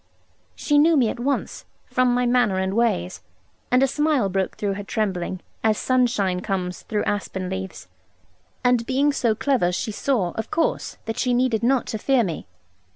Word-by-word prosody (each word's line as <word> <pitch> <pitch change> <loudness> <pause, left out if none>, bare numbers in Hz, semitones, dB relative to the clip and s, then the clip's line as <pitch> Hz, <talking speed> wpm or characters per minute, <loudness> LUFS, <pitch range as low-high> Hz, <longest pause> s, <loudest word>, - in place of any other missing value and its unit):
She 295 -1 +2
knew 320 +1 +5
me 240 -5 +3
at - - -5
once, 275 +3 -2 0.2
from 255 -1 +2
my 245 0 +1
manner 240 -5 +2
and 190 0 -1
ways, 200 - 0 0.5
and 250 +2 +4
a - - +4
smile 295 -6 +1
broke 190 0 -2
through 200 -2 -1
her 205 +1 -5
trembling, 190 -4 -2 0.2
as 215 -1 +3
sunshine 235 -8 +1
comes 180 -2 -3
through 210 -1 -2
aspen 190 -2 -3
leaves; 190 0 -6 0.8
and 245 -2 +2
being 280 +3 +2
so 230 -5 +1
clever, 245 -9 +1
she 200 +4 -2
saw, 210 -5 0
of 220 +3 -5
course, 330 - -1
that 225 0 -4
she 250 -1 +1
needed 245 -3 +1
not 255 +2 +2
to 220 - -4
fear 265 +1 +3
me. 170 -6 -4
225 Hz, 175 wpm, -23 LUFS, 190-255 Hz, 0.8 s, knew